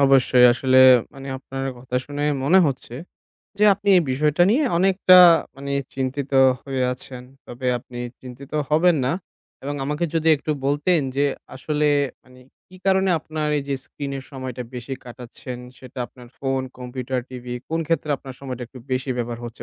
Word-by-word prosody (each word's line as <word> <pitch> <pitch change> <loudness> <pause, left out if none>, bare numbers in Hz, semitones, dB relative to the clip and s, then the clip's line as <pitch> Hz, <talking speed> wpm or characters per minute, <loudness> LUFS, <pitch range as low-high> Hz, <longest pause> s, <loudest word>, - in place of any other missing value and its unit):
অবশ্যই, 135 -2 +5
আসলে 130 +1 +3 0.4
মানে 135 0 -9
আপনার 135 0 -6
কথা 125 0 -4
শুনেই 145 +1 -1
মনে 175 +7 +5
হচ্ছে, 135 -3 -4 0.6
যে 210 - +4
আপনি 200 +1 -5
এ - - +4
বিষয়টা 150 +5 +2
নিয়ে 260 +8 +3
অনেকটা 185 0 +5 0.4
মানে 140 0 -7 0.2
চিন্তিত 135 +1 -3 0.3
হয়ে 135 -2 -3
আছেন। 125 0 -9 0.2
তবে 125 +1 -6
আপনি 120 +1 -11 0.2
চিন্তিত 130 +2 -11 0.2
হবেন 165 +3 +4
না 130 - +1 0.5
এবং 145 +2 -4
আমাকে 150 +4 -1
যদি 165 0 +1
একটু 150 - -5 0.2
বলতেন 145 +5 +2 0.2
যে, 140 - +3 0.3
আসলে 150 +3 -1 0.4
মানে 125 0 -19 0.3
কি 185 - -15
কারণে 190 -1 +3
আপনার 155 -1 -4
এইযে 140 0 -3
স্ক্রিনের 140 -2 -6
সময়টা 130 -2 -6
বেশি 125 +2 -6
কাটাচ্ছেন? 125 0 -9 0.2
সেটা 130 0 -12
আপনার 125 -1 -16
phone, 135 -1 -1
computer, 125 +1 -4
TV 125 -1 -9 0.2
কোন 165 +1 -1
ক্ষেত্রে 165 -2 -1
আপনার 135 -1 -10
সময়টা 130 -3 -6
একটু 130 - -13
বেশি 130 +1 -1
ব্যবহার 120 -1 -3
হচ্ছে 120 0 -8
135 Hz, 160 wpm, -22 LUFS, 125-150 Hz, 0.6 s, অবশ্যই